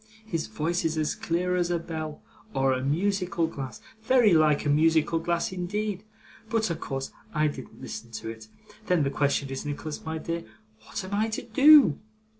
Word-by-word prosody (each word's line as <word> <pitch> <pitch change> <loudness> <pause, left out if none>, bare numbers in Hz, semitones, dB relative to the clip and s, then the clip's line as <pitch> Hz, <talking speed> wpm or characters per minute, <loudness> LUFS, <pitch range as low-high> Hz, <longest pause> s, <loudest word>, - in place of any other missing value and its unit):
His 165 - -2
voice 160 +10 -1
is 160 0 0
as 155 -1 0
clear 180 +2 -1
as 175 -1 +1
a 175 - +1
bell 160 -2 -6 0.3
or 135 0 +3
a 130 0 -2
musical 180 +3 0
glass 140 -5 -6 0.2
very 230 -3 +5
like 155 -2 +4
a - - +1
musical 160 +2 +3
glass 170 +2 -1
indeed 195 +2 -3 0.5
but 220 -4 +1
of 170 - -3
course 135 -1 -4 0.2
I 155 0 +3
didn't 150 - -5
listen 120 - -7
to 110 +1 -5
it. 110 -1 -9 0.4
Then, 180 -4 +3
the 140 - 0
question 140 0 +1
is, 135 - -4
Nicholas 150 +1 -5
my 160 0 -3
dear, 165 +1 -4 0.4
what - - -4
am 190 +2 -7
I 215 +2 +1
to 220 - -4
do? 270 - +7
165 Hz, 185 wpm, -27 LUFS, 145-185 Hz, 0.5 s, do